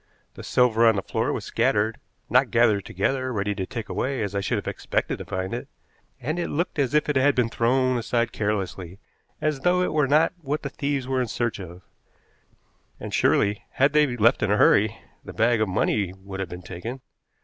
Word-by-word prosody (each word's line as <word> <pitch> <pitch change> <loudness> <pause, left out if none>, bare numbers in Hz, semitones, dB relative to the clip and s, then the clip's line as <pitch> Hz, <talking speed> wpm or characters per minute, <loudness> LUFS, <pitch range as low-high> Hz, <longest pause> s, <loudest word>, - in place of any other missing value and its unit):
The - - -10
silver 115 -2 +3
on 110 - +5
the 95 - -2
floor - - -1
was - - -4
scattered, 110 +2 +1 0.3
not 125 0 +3
gathered 115 -5 +3
together 130 +7 -1
ready 105 -2 -1
to 95 -2 -4
take 115 -4 -6
away 130 -3 -2
as 100 -1 -4
I 100 - -1
should - - -1
have - - -5
expected - - -2
to - - -7
find 95 0 -4
it, - - -5 0.5
and 155 +3 -3
it 175 - -2
looked 165 +1 -2
as 140 +1 +1
if 150 - +3
it 150 - 0
had 140 +2 +3
been 125 -3 +2
thrown 130 +2 +1
aside 115 0 0
carelessly, 95 -4 -3 0.4
as 155 -2 0
though 180 +4 +2
it - - -1
were 150 -3 +2
not 155 +5 +3
what 150 0 -3
the 140 - -3
thieves 140 -2 -2
were 130 -1 0
in 125 - -1
search 115 -1 -2
of; 90 -1 -10 1.2
and - - -7
surely, 100 +1 +2
had 140 +2 +3
they 150 -5 +3
left 115 +1 +4
in 105 - +1
a 105 - +3
hurry, 105 +1 +4 0.3
the - - -9
bag 115 0 +2
of 110 - +1
money 95 0 0
would 95 0 -8
have 95 -3 -3
been 90 0 -8
taken. 115 +10 -7
115 Hz, 210 wpm, -24 LUFS, 100-135 Hz, 1.2 s, on